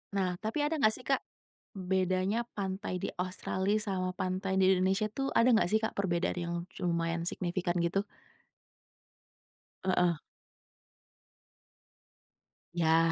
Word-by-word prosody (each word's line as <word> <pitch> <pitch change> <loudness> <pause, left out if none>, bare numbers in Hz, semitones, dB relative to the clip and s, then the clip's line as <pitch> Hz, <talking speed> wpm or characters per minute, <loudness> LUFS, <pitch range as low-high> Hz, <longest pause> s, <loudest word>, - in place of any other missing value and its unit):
Nah 185 -2 +1
tapi 260 +7 0
ada 305 -1 -1
gak 215 0 +5
sih 255 - -10
Kak, 270 -1 +2 0.6
bedanya 185 +3 +1 0.2
pantai 190 -1 -2
di - - 0
Australia 190 +2 0
sama 190 -3 -1
pantai 190 +1 -1
di 190 - +5
Indonesia 190 +3 +2
tuh 270 0 -1
ada 235 +1 +6
gak 220 -5 +4
sih 220 - +4
Kak - - 0
perbedaan 180 -2 0
yang 170 0 -2 0.3
lumayan 170 -1 0
signifikan 175 0 -1
gitu? 170 +3 +1 1.8
Heeh. 180 -4 +2 2.5
Ya. 165 -1 +4
185 Hz, 120 wpm, -31 LUFS, 175-205 Hz, 2.5 s, ada